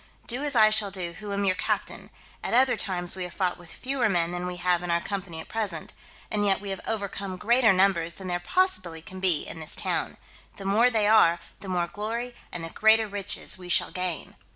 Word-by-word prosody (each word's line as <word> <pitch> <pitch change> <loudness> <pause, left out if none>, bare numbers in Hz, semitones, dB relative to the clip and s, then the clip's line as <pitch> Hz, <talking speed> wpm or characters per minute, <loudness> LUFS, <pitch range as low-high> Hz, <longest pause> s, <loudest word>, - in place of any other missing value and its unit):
Do 245 +4 0
as 290 -3 0
I 215 -2 +6
shall 215 -2 +2
do 180 -3 -4
who 210 -1 -6
am 200 0 -1
your 185 - +3
captain: - - -3 0.3
at - - 0
other 260 0 +5
times 180 -3 -2
we 185 - -4
have 180 - -9
fought 180 -2 0
with 175 -1 -12
fewer 260 -3 -1
men 175 -3 +1
than 180 0 -3
we 180 0 -5
have 175 -1 +1
in 175 - -5
our 170 0 +3
company 185 -3 -5
at - - -8
present, 205 -8 -3 0.4
and 210 -1 +1
yet 195 -1 +3
we 200 0 -5
have 195 - -4
overcome 200 -3 -3
greater 235 +3 +4
numbers 185 -3 +2
than 190 - -7
there 175 -1 -1
possibly 175 - 0
can 185 +2 -9
be 180 -5 +2
in 165 - -7
this 155 - -2
town: - - -2 0.4
the 195 - -9
more 220 +5 +4
they 220 -3 +1
are, 175 -6 +5 0.2
the 195 - -8
more 175 -2 +1
glory 230 +6 -4 0.2
and 175 - -6
the 165 - -5
greater 220 0 +4
riches 200 -2 -4
we 180 -1 -10
shall - - +2
gain." 180 -4 -4
190 Hz, 225 wpm, -27 LUFS, 175-215 Hz, 0.4 s, I